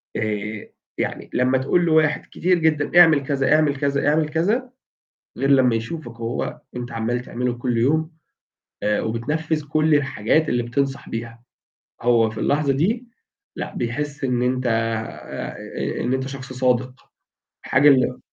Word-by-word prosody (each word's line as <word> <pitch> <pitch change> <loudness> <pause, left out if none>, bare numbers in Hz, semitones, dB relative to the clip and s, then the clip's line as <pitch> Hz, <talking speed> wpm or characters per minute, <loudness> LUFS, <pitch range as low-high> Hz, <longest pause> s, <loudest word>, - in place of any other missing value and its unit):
آآ، 105 -1 -3 0.3
يعني - - -3
لمّا 130 +1 +2
تقول 170 +7 +1
لواحد 155 -2 +2
كتير 180 +1 +2
جدًا 160 +1 +3
اعمل 155 -5 +5
كذا، 135 -1 +2
اعمل 150 -2 +2
كذا، 140 +1 0
اعمل 155 0 +2
كذا، 205 +11 0 0.7
غير 135 - 0
لمّا 130 -3 +5
يشوفك 115 +1 -5
وهو 115 +1 -3 0.2
أنت 125 0 -5
عمّال 115 +2 -1
تعمله 125 0 -2
كل 120 -1 -1
يوم، 155 +7 +2 0.7
آآ 105 0 +1
وبتنفّذ 150 +7 -2
كل 155 +1 +3
الحاجات 145 +2 +1
اللي 120 0 +1
بتنصح 135 +3 -2
بيها. 115 0 -6 0.6
هو 115 -2 +3
في 110 0 -8
اللحظة 145 +2 +1
دي 220 - 0 0.5
لأ، - - -6
بيحس 145 +4 -3
إن 125 -2 0
أنت 125 0 0
آآ، 115 0 -3 0.5
إن 125 - 0
أنت 130 0 -1
شخص 135 -1 -8
صادق، 125 0 -1 0.5
حاجة 140 +4 +5
ال 130 -2 +3
130 Hz, 145 wpm, -22 LUFS, 120-150 Hz, 0.7 s, اعمل